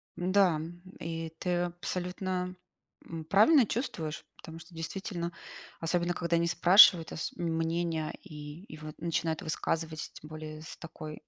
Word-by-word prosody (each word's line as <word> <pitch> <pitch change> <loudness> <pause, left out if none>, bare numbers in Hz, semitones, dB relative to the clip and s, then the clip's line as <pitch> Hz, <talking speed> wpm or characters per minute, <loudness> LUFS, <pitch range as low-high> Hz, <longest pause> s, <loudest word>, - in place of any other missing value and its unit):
М-да, 185 -1 +3
м, 170 +3 -7 0.2
и 165 0 -4
ты 180 -1 0
абсолютно, 180 +1 -3 0.5
м, 165 -1 -6
правильно 225 - +6
чувствуешь. 180 - -3
Потому 165 0 -10
что, 165 +1 -14
действительно, 170 +1 -4 0.5
особенно 175 +1 0
когда 170 -1 0
не 170 0 +2
спрашивают 175 0 +7
ос 160 - -3
мнения 165 -1 -1
и 150 -2 -9
и - - -8
вот 155 0 -8
начинают 165 -1 -1
высказывать, 160 0 -2
тем 150 - -11
более 155 0 -7
с 160 - -9
такой, 155 -2 -8
165 Hz, 140 wpm, -30 LUFS, 160-180 Hz, 0.5 s, спрашивают